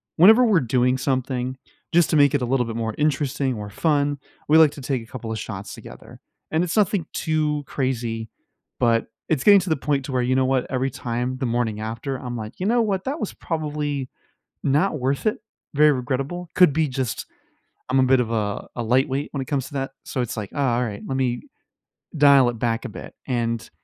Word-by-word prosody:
whenever 220 +9 +7
we're 205 -7 +4
doing 125 +1 +2
something, 130 -1 -2 0.4
just 170 -1 +4
to - - +2
make 145 -2 +5
it 140 - +1
a - - 0
little 125 0 +1
bit 115 0 -5
more 110 -1 -2
interesting 140 -3 0
or 105 -1 -6
fun, 145 +3 +1 0.3
we 155 - +6
like 160 -2 +7
to 145 - -10
take 130 -3 -2
a 115 - -18
couple 115 -3 -6
of 110 - -3
shots 100 -2 -6
together. - - -12 0.3
And 160 +2 +2
it's 180 +5 -2
nothing 200 -4 +2
too 150 -2 0
crazy, 115 -4 -2 0.5
but 115 -1 +2 0.2
it's 150 -5 0
getting 200 -1 +8
to 180 - -4
the 160 - +3
point 135 0 -1
to 135 - -5
where, 125 - +2
you 125 +1 +1
know 130 0 +3
what, 130 -1 +1
every 130 +1 0
time 125 +1 -3
the 130 - -2
morning 115 -3 -1
after, 115 +5 -4
I'm 125 -1 -6
like, 110 +6 -8
"You - - 0
know 235 +3 +3
what, 195 -4 0
that 290 +4 -2
was 210 - -3
probably 150 -4 -3 0.5
not 150 +2 +2
worth 135 - -1
it, 215 - +1 0.4
very 150 +1 +6
regrettable." 135 +7 -3
Could 180 -5 +6
be 160 +1 +2
just 130 -3 -3 0.6
I'm 135 - +3
a 130 - +5
bit 130 0 +4
of 115 -2 -1
a 105 -2 -2
a 120 - -2
lightweight 130 +4 +1
when 140 - -2
it - - -4
comes 140 0 -2
to 155 - -14
that. 135 0 -2
So 130 - -2
it's 120 -1 -3
like, 105 -2 -4
"Ah, 130 -4 +1
alright, 110 -4 -3
lemme 130 -3 -1 0.8
dial 140 -3 +6
it 120 -2 -5
back 115 -1 0
a - - -4
bit." - - -9
And 115 -3 -1
130 Hz, 215 wpm, -23 LUFS, 120-150 Hz, 0.8 s, getting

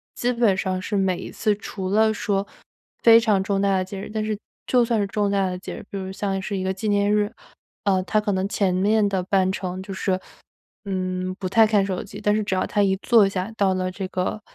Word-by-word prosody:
基 245 +1 0
本 230 -5 +3
上 185 -1 -1
是 205 +1 -2
每 190 -2 +1
一 - - -7
次， 210 -2 0
除 190 -2 -6
了 220 +2 +3
说 200 -1 -1 0.6
非 230 -1 +8
常 210 -4 +2
重 195 0 0
大 195 -1 +2
的 185 - -1
节 195 +1 -7
日 - - -7
但 215 -1 -1
是 215 -1 -2 0.3
就 250 -2 +3
算 230 -2 +1
是 200 - 0
重 205 0 0
大 195 -1 +2
的 180 0 -3
节 180 - -7
日， - - -10
比 200 - -5
如 190 0 -5
像 195 -1 -2
是 200 +1 -3
一 185 - -2
个 190 0 0
纪 210 +3 -3
念 205 0 +2
日， 210 0 +1 0.5
呃， 190 -2 +2
他 215 - +1
可 210 -1 -1
能 190 +1 0
前 190 -4 +1
面 205 +3 +3
的 190 -2 -1
半 190 0 +2
程 185 -1 -4
就 195 0 -7
是， 190 0 -1 0.6
嗯， 185 -2 -2
不 185 - -2
太 225 +3 +5
看 205 -2 +2
手 185 -2 -3
机。 200 - -10
但 210 0 +2
是 215 - 0
只 195 - -2
要 185 - +1
他 205 - +1
一 190 -1 +2
坐 225 -5 +5
下 190 +2 -3
到 195 -3 +2
了 185 0 -1
这 190 +1 -5
个 185 +3 -2
195 Hz, 270 characters per minute, -23 LUFS, 190-210 Hz, 0.6 s, 非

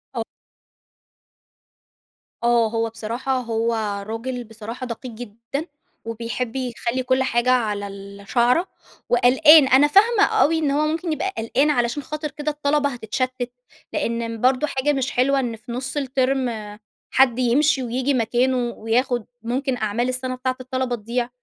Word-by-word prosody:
أ - - -1 2.2
آه. 235 -1 +4
هو 225 0 -1
بصراحة 235 +4 -3
هو 230 -1 -1 0.3
راجل 245 +3 -4
بصراحة 225 +2 -8
دقيق 245 +1 -6
جدًا، 235 +6 -6 0.4
وبيحب 230 +2 -4
يخلّي 250 -1 -2
كل 260 +1 +2
حاجة 245 -1 +1
على 210 -5 0
الشَعرة 200 - 0 0.4
وقلقان. 265 +5 +7
أنا 270 +3 +6
فاهمة 410 +6 +5
أوي 360 -8 +3
إن 300 -3 +1
هو 300 +2 +1
ممكن 330 +2 -2
يبقى 380 +5 -2
قلقان 245 +6 +1
علشان 245 0 0
خاطر 300 +1 -5
كده 300 +1 -3
الطلبة 295 0 +1
هتتشتّت. 250 +1 -3 0.4
لإن 230 -5 -2
برضه 255 +3 +3
حاجة 280 +1 0
مش 270 -1 -1
حلوة 275 +2 +2
إن 240 -3 -2
في 225 +2 -11
نُص 260 +4 -4
الترم 265 -1 0 0.6
حد 255 -2 +4
يمشي 265 +3 +3
وييجي 255 +3 0
مكانه 250 +2 +1
وياخُد 240 0 -1 0.2
ممكن 255 +2 -1
أعمال 220 +3 -1
السنة 255 0 -2
بتاعة 255 0 -2
الطلبة 255 -1 -2
تضيع. 235 +2 -3
255 Hz, 135 wpm, -22 LUFS, 235-275 Hz, 2.2 s, وقلقان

